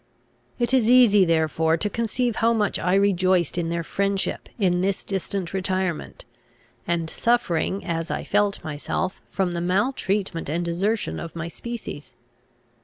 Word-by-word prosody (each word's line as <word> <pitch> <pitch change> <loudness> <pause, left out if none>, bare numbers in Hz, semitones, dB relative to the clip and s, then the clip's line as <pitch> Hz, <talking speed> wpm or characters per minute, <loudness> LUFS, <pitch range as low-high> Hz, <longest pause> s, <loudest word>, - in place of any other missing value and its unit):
It 240 +2 0
is 240 -4 +4
easy 230 -6 +6
therefore 160 0 +2
to 210 - 0
conceive 230 +2 -1
how 230 +1 +3
much 210 -3 0
I 180 +2 +1
rejoiced 185 -4 +2
in 170 -1 -1
their 170 0 -2
friendship, 195 +3 -1
in 180 -5 +2
this 195 +1 -1
distant 195 -2 -3
retirement, 185 -3 -2 0.6
and 170 -1 0
suffering, 195 -3 0
as 165 -2 -2
I - - -2
felt 205 0 +1
myself, 155 +5 -3
from 190 -2 -1
the 170 0 -3
maltreatment 190 - 0
and 170 +3 -1
desertion 195 +6 -1
of 170 0 -7
my 165 0 -4
species. 225 -5 -7
190 Hz, 145 wpm, -24 LUFS, 170-205 Hz, 0.6 s, easy